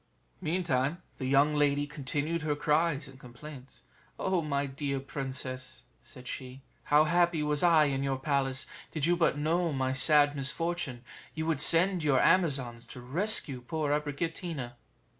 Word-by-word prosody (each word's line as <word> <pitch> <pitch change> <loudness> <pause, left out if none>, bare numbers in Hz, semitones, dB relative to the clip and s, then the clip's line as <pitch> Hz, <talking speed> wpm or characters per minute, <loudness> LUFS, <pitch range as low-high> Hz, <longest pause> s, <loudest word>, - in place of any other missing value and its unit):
Meantime 165 -3 0 0.2
the 130 - -3
young 140 +3 +4
lady 145 -1 +2
continued 150 +3 -3
her 150 -2 -1
cries 150 0 +1
and 135 -1 -14
complaints: 130 +2 -12 0.3
"Oh 190 -2 0
my 140 -2 -1
dear 140 0 -3
princess," 130 -2 -5 0.2
said 125 0 -14
she, 130 +1 -7 0.2
"how 150 +1 +5
happy 170 0 +2
was 150 -1 +1
I 165 -3 +5
in 135 -2 -1
your 135 -1 -1
palace! 135 -1 -1 0.2
Did 155 -3 -1
you 175 +1 +3
but 165 -4 +1
know 165 +3 0
my 130 -2 -1
sad 145 +2 +4
misfortune, 140 -2 -2 0.3
you 160 - -3
would 160 -3 +1
send 175 +2 +4
your 140 -4 +3
Amazons 135 -10 +1
to - - -10
rescue 140 - -1
poor 150 +3 -2
Abricotina." 150 -2 -3
145 Hz, 150 wpm, -30 LUFS, 135-165 Hz, 0.3 s, how